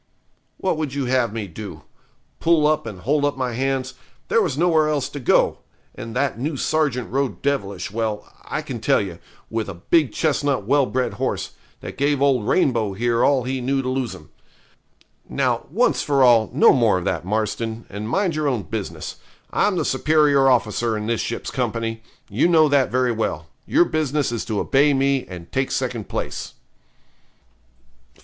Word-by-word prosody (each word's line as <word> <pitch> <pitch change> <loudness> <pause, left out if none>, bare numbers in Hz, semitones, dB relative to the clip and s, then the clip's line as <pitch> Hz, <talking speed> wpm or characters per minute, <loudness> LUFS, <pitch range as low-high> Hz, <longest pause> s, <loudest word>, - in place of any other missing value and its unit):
'What 185 -4 -1
would 150 -3 -3
you 140 -2 -1
have 125 -3 +1
me 110 -1 -4
do? 90 -3 -9 0.6
Pull 165 -2 +3
up 155 -4 +1
and 95 -5 -8
hold 145 +6 +1
up 145 -2 0
my 130 -2 -2
hands? 130 +1 -1 0.4
There 230 - +4
was 140 -6 -1
nowhere 160 -2 +3
else 145 -3 0
to 145 - -7
go; 125 - +2 0.3
and 115 0 -8
that 135 -3 0
new 145 +3 -2
sergeant 140 -6 0
rode 135 0 -2
devilish 100 -10 -2
well, 110 -1 -2 0.2
I - - -4
can - - -6
tell - - +3
you, 90 -4 -5 0.3
with 110 -2 -2
a 95 - -6
big 140 - +2
chestnut 145 -5 0
well 140 +3 +3
bred 130 0 -1
horse, - - -2 0.3
that - - -8
gave 140 0 +2
old 135 -6 +2
Rainbow 115 - +2
here 115 +3 +1
all 135 -3 +3
he 130 +1 -3
knew 135 +2 0
to 130 - -2
lose 130 -2 -2
him. 75 0 -15 1.0
Now, - - 0
once - - +2
for 140 -2 +2
all, 115 -3 +5
no 135 - +6
more 115 -7 +3
of 90 - -4
that, 85 -3 -1
Marston, 110 +3 -2
and 105 +2 -6
mind 185 +1 0
your 155 -1 0
own 125 -7 0
business. 80 - -5 0.4
I'm 200 -3 +2
the 160 - 0
superior 145 -1 +3
officer 120 -2 +1
in 105 - -4
this 115 0 0
ship's 115 - -4
company 115 -3 -2 0.3
you 110 +11 +2
know 160 -3 +5
that 140 -2 +3
very 125 0 +1
well 80 -9 -3 0.2
your 175 - +4
business 150 -5 0
is 115 - -3
to 110 -4 -2
obey 140 +1 +3
me, 135 0 +1
and 85 -2 -10
take 135 0 0
second 120 -5 -3
place.' - - -4
130 Hz, 180 wpm, -22 LUFS, 110-145 Hz, 1.0 s, no